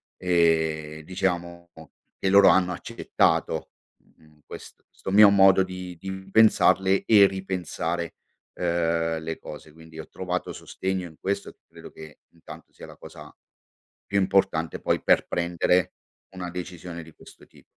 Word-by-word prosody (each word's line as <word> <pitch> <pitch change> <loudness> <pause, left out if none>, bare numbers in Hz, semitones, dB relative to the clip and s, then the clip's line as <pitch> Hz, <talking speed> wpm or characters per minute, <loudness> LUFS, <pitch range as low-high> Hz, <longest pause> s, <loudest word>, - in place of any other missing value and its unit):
e 80 -3 0
diciamo 85 -1 -4 0.5
che 95 - 0
loro 100 0 +7
hanno 90 -1 +3
accettato, - - -1 0.3
mhmm, 75 -1 -27
questo - - -12 0.3
mio 105 0 +8
modo 95 -1 +5
di 90 -1 -8
di 95 +3 -7 0.2
pensarle 95 -3 +3
e 100 -3 +6
ripensare, 90 -3 -4 0.4
uhm, 85 -1 -1
le 80 0 -6
cose. 75 0 -11
Quindi 80 0 -14
ho 80 - -8
trovato 90 -1 -4
sostegno 95 -1 -5
in 80 - -16
questo, 100 +1 -4
credo - - -13
che 80 -2 -13
intanto 85 - -14
sia - - -12
la - - -14
cosa - - -13 0.7
più 100 - -1
importante 95 -4 0
poi - - 0
per - - +2
prendere 85 0 0 0.4
una 90 -2 -7
decisione 90 -1 -8
di 80 - -16
questo - - -17
tipo. - - -22
90 Hz, 135 wpm, -25 LUFS, 80-95 Hz, 0.7 s, mio